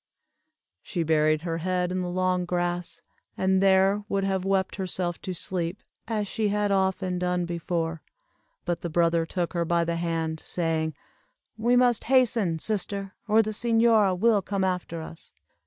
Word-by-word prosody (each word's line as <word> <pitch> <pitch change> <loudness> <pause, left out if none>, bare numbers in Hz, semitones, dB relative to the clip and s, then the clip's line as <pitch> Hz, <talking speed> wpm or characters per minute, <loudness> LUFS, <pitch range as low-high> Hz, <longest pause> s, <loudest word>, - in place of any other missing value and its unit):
She 175 -4 -3
buried 155 0 +2
her 165 -1 -2
head 180 +1 -1
in 185 0 -1
the 180 - -3
long 185 0 0
grass, 175 -1 -2 0.3
and 190 0 +2
there 195 +1 +4
would 195 -1 0
have 190 -1 0
wept 195 0 0
herself 180 -2 -3
to 185 - -5
sleep, 175 +1 -3 0.2
as 215 -3 -1
she 215 +2 -1
had 205 0 0
often 190 -1 0
done 180 0 0
before, 165 -1 -3 0.6
but 170 -1 -2
the 170 - -3
brother 165 0 +2
took 175 0 -2
her 170 -1 0
by 170 0 +1
the 170 0 -1
hand, 165 -2 -2
saying, 160 -3 -1 0.6
"We 235 +3 +2
must 245 -2 +3
hasten, 235 -9 +3
sister, 200 +1 -2
or 220 +1 +5
the 215 - -3
señora 225 -4 +3
will 215 +1 +3
come 195 0 -2
after 180 -3 -2
us." 160 - -12
185 Hz, 160 wpm, -26 LUFS, 170-200 Hz, 0.6 s, or